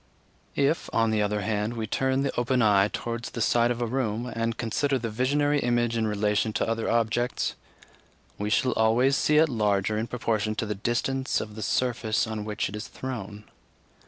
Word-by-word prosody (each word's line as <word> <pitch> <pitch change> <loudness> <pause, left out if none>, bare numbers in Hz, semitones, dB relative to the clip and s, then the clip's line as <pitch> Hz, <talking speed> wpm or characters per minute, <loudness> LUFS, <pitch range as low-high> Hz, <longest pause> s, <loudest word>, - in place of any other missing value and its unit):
If, 140 +4 +1
on 115 -1 +2
the 110 -1 +1
other 105 0 0
hand, 105 +2 -1
we 110 -1 -2
turn 130 +5 0
the 140 - -2
open 125 +1 +1
eye 100 -2 +5
towards 115 +2 -4
the - - -7
side 120 +1 +3
of 120 0 -1
a - - +1
room, 120 -2 -1
and 115 -2 -2
consider 135 +4 0
the 115 -3 -4
visionary 145 +5 +1
image 120 -2 +1
in 110 -1 +1
relation 105 +1 0
to 115 - 0
other 115 0 -1
objects, 120 +2 0 0.9
we 105 0 -1
shall 120 +3 +2
always 120 +5 +3
see 150 +1 +3
it 160 +1 +6
larger 105 -4 +1
in 115 - -2
proportion 110 -3 -1
to 110 - -2
the 105 - -2
distance 120 +6 -1
of 105 -1 -6
the 110 - -8
surface 115 0 0
on 110 -2 -4
which 105 -1 -2
it 100 - -7
is 105 - -6
thrown. 105 -5 -6
115 Hz, 190 wpm, -26 LUFS, 105-125 Hz, 0.9 s, it